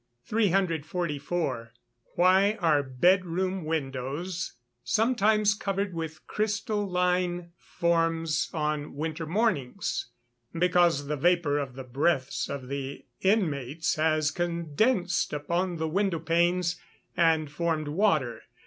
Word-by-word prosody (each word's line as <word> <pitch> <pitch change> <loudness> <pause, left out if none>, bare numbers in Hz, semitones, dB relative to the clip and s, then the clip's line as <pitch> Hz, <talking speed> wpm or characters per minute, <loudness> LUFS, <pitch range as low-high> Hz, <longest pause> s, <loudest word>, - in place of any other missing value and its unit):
344. 165 - -1 0.4
Why 190 +4 +4
are 160 -5 +3
bed 175 +8 +3
room 185 +1 -2
windows 155 +4 -3 0.3
sometimes 215 - +3
covered 200 -2 -2
with 160 -2 -6
crystalline 180 -5 -1
forms 165 -3 0
on 150 -2 -2
winter 160 +2 -3
mornings? 180 - -1 0.5
Because 175 -4 +3
the 150 +1 -2
vapour 170 -2 +2
of 135 -3 -5
the 135 - -6
breaths 135 +2 0
of 135 -2 -5
the 140 0 -5 0.2
inmates 160 - +1
has 155 -1 +1
condensed 175 - 0
upon 170 +4 -1
the 160 0 -1
window 190 +1 0
panes, 170 +2 +1 0.3
and 160 -3 +2
formed 160 -1 -1
water. 155 - +1
170 Hz, 105 wpm, -28 LUFS, 150-185 Hz, 0.5 s, Why